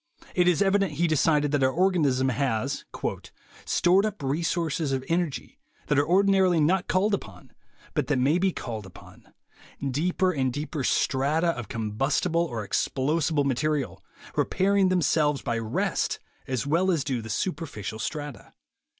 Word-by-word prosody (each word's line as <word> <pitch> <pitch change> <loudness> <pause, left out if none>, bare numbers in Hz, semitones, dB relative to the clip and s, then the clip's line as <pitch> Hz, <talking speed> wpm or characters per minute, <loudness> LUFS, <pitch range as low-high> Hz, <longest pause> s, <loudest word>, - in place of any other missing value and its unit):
It 180 -1 +3
is 180 +2 +4
evident, 195 -3 +2
he 165 +4 +1
decided, 150 -2 +2
that 145 -2 +1
our 130 - +4
organ 180 +2 +2
ism 130 -1 +2
has 130 0 -1 0.8
"stored 180 +3 +3
up 210 -8 -7
reserves 160 +1 -1
of 130 -1 -2
energy 170 -4 -2 0.3
that 145 -1 +2
are 145 - +1
ordinarily 190 -1 +4
not 180 +5 +2
called 200 +3 +2
upon, 100 - -5 0.4
but - - -1
that 145 - +1
may 140 +7 +2
be 190 +1 +2
called 110 - -6
upon: 95 - -16 0.6
deeper 180 +6 +1
and 130 -6 0
deeper 145 +2 -4
strata 145 +7 +1
of 120 -9 -3
combustible 135 - 0
or 115 -11 -3
explosible 150 - 0
material... 145 +2 -1 0.3
repairing 195 0 +2
themselves 150 -4 +2
by 115 -1 -1
rest 110 -1 -1 0.3
as 130 -1 -2
well 170 +6 +2
as 165 -6 +1
do 130 -5 -2
the 110 - -9
superficial 135 - -3
strata." 145 +3 -6
150 Hz, 150 wpm, -26 LUFS, 130-175 Hz, 0.8 s, is